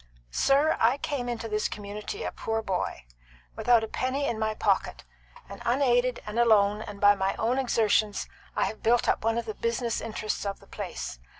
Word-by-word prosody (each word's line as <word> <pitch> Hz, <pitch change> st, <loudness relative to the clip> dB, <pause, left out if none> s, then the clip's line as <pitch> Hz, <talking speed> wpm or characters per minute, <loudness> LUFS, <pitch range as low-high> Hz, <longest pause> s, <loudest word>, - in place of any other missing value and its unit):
"Sir, 280 Hz, -, +3 dB
I 240 Hz, +4 st, +4 dB
came 265 Hz, -4 st, -3 dB
into 230 Hz, -1 st, -3 dB
this 215 Hz, -1 st, 0 dB
community 210 Hz, -, -6 dB
a -, -, -2 dB
poor 225 Hz, 0 st, -3 dB
boy, 180 Hz, -, -3 dB, 0.5 s
without 235 Hz, -2 st, +4 dB
a -, -, -2 dB
penny 260 Hz, +5 st, -1 dB
in 230 Hz, -5 st, -2 dB
my 220 Hz, 0 st, 0 dB
pocket, -, -, 0 dB, 0.4 s
and -, -, -10 dB
unaided 245 Hz, -1 st, +2 dB
and 210 Hz, +2 st, -3 dB
alone 210 Hz, -3 st, +4 dB
and 205 Hz, -2 st, -8 dB
by 205 Hz, 0 st, +7 dB
my 195 Hz, -1 st, -1 dB
own 240 Hz, +4 st, 0 dB
exertions 215 Hz, -4 st, +1 dB, 0.3 s
I -, -, +2 dB
have 215 Hz, -, -5 dB
built 240 Hz, +1 st, +3 dB
up -, -, +1 dB
one 225 Hz, +1 st, +1 dB
of 235 Hz, -, -2 dB
the 215 Hz, -, -4 dB
business 230 Hz, +1 st, -1 dB
interests 215 Hz, -1 st, -3 dB
of 200 Hz, -1 st, -3 dB
the -, -, -18 dB
place. -, -, -6 dB
225 Hz, 190 wpm, -27 LUFS, 210-245 Hz, 0.5 s, by